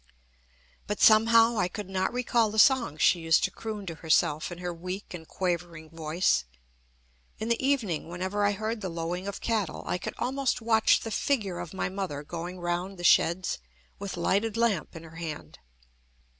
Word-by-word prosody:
But 210 - -3
somehow 225 +1 +6
I 180 - +2
could 205 +2 -7
not 190 0 -1
recall 240 -2 +1
the 215 - -6
songs 235 - +4
she 175 - +5
used 165 -1 +3
to - - +1
croon 215 -3 -6
to 170 - -5
herself 160 -1 +1
in 175 - -6
her 175 0 -4
weak 185 +4 -6
and 160 -2 -8
quavering 170 -3 -3
voice. 165 - +1 0.9
In 220 - -4
the 235 +2 0
evening, 225 - 0
whenever 185 +4 -2
I 205 0 +3
heard 215 +2 -3
the 190 - -3
lowing 170 +3 -4
of 200 - -5
cattle, 220 -6 -1
I 180 - -2
could - - -5
almost 265 +1 -1
watch 225 -1 +3
the 225 - -5
figure 210 -9 -1
of - - -6
my 190 - -2
mother 185 -7 -4
going 175 +4 -6
round 175 +2 -3
the 175 - -8
sheds 170 +1 +3 0.4
with 200 -3 -5
lighted 205 +6 0
lamp 225 -10 0
in 165 - -8
her 165 0 -12
hand. 160 -3 -7
190 Hz, 180 wpm, -28 LUFS, 170-220 Hz, 0.9 s, somehow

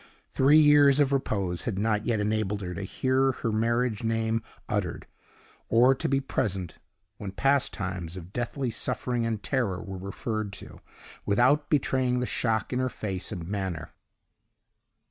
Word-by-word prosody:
Three 140 +3 +5
years 145 -2 +6
of 140 -1 +3
repose 100 -9 -1
had 110 -6 -2
not 105 +1 0
yet 115 -3 +1
enabled 105 -1 -1
her 90 0 -4
to 100 - -5
hear 130 +7 +1
her 115 -2 -2
marriage 115 +1 0
name 115 0 0 0.3
uttered, - - -2 0.6
or 125 +3 +6
to 130 - -2
be 135 0 +2
present 100 -10 -2 0.4
when 100 -2 -6
past 135 +6 +2
times 90 -4 -5
of 90 +2 -10
deathly 120 +1 -2
suffering 120 +1 -1
and 110 -3 -3
terror 115 -10 0
were 95 0 -7
referred 105 +2 -4
to, - - -10 0.4
without 130 +8 +3
betraying 130 -3 +1
the 125 - 0
shock 115 -1 -1
in 125 - 0
her 130 0 +1
face 95 -4 -4
and 85 -5 -5
manner. 95 -5 -4
115 Hz, 155 wpm, -27 LUFS, 100-130 Hz, 0.6 s, years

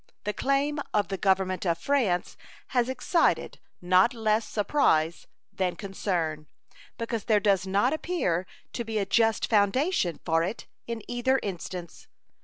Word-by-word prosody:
The 210 - -2
claim 280 +4 0 0.2
of 205 -4 +1
the 195 - -2
Government 190 -1 +1
of 170 -3 +1
France 210 -5 0 0.3
has 245 -1 +1
excited 260 +6 +1 0.2
not 185 +7 +4
less 220 0 +1
surprise 175 - +1 0.3
than 185 -2 -1
concern, 170 -6 -3 0.5
because 230 -2 -3
there 215 -3 +4
does 195 -2 +2
not 205 +8 +2
appear 190 - -1 0.3
to 235 - -3
be 220 -1 -3
a 200 - +1
just 225 +2 +2
foundation 210 - +2
for 165 -1 +2
it 190 +7 -3 0.2
in 230 -2 -4
either 250 +2 +1
instance. 180 -3 -6
205 Hz, 140 wpm, -27 LUFS, 185-245 Hz, 0.5 s, not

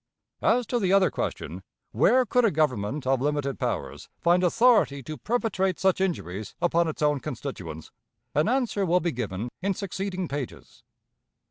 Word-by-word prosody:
As 245 +1 +3
to 240 +2 -1
the 190 -4 +1
other 195 -1 +4
question - - -4 0.3
Where 255 0 +4
could 245 +3 +2
a 225 - +5
government 140 - 0
of 130 -1 +2
limited 145 -2 -1
powers - - -3
find 175 +2 +3
authority 195 - +4
to 155 +4 -6
perpetrate 200 -3 0
such 190 -1 +2
injuries 105 - -3
upon 170 -1 +2
its 155 -1 -3
own 150 -1 +2
constituents? 110 - -6 0.4
an 150 +8 +2
answer 245 -5 +1
will 180 0 +3
be 175 -1 -1
given 115 -2 -4
in 195 0 0
succeeding 190 -1 -3
pages. 140 -3 -7
170 Hz, 155 wpm, -26 LUFS, 135-195 Hz, 0.4 s, a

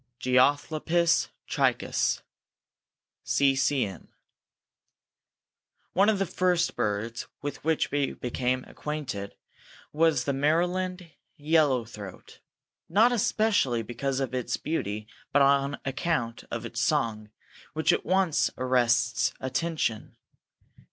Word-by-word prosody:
(Geothlypis 150 +6 +2 0.2
trichas.) - - +1 1.0
C. 140 -1 +3
C. 135 0 +2
M. 95 -5 -9 1.9
One 200 +3 +4
of 215 - +2
the 195 - 0
first 180 -1 +1
birds 110 +3 -2 0.2
with 145 -1 -5
which 160 0 +1
we 145 -1 0
became 125 +1 -2
acquainted 130 -10 -5 0.6
was 155 -4 +3
the 140 - -1
Maryland 175 +5 0 0.3
Yellow 145 -5 +2
throat, 105 -4 -11 0.5
not 215 +8 +5
especially 205 - +1
because 130 +4 -2
of 135 -2 -2
its 125 -1 -1
beauty 105 -9 -3 0.2
but 145 0 +5
on 140 0 +3
account 135 -4 -2
of - - -4
its - - -4
song, 110 -2 0 0.4
which 160 +2 +2
at - - -1
once 185 -4 +2
arrests 125 0 +2
attention. 130 -4 -2
140 Hz, 105 wpm, -27 LUFS, 120-165 Hz, 1.9 s, not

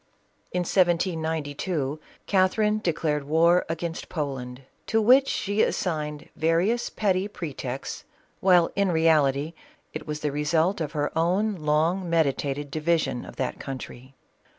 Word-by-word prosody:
In 180 - 0
1792, 160 -4 0 0.3
Catherine 210 +3 +2
declared 155 -6 -1
war 170 +4 +3
against 165 0 -4
Poland, 135 -4 -4 0.2
to 225 - +2
which 255 +5 +5
she 205 +2 0
assigned 150 -4 -1
various 175 +9 +1
petty 195 -2 0
pretexts, 140 -9 -6 0.4
while 180 -3 +4
in 200 -2 +2
reality, 155 -2 +2 0.4
it - - -6
was 150 0 -4
the 150 - -1
result 160 +6 +1
of 150 -1 -3
her 145 -1 -2
own 185 +6 +1
long 165 +2 0
meditated 145 -3 0
di 155 - -2
vision 155 -6 0
of - - -11
that 130 - -3
country. 130 -1 -8
160 Hz, 130 wpm, -26 LUFS, 145-185 Hz, 0.4 s, which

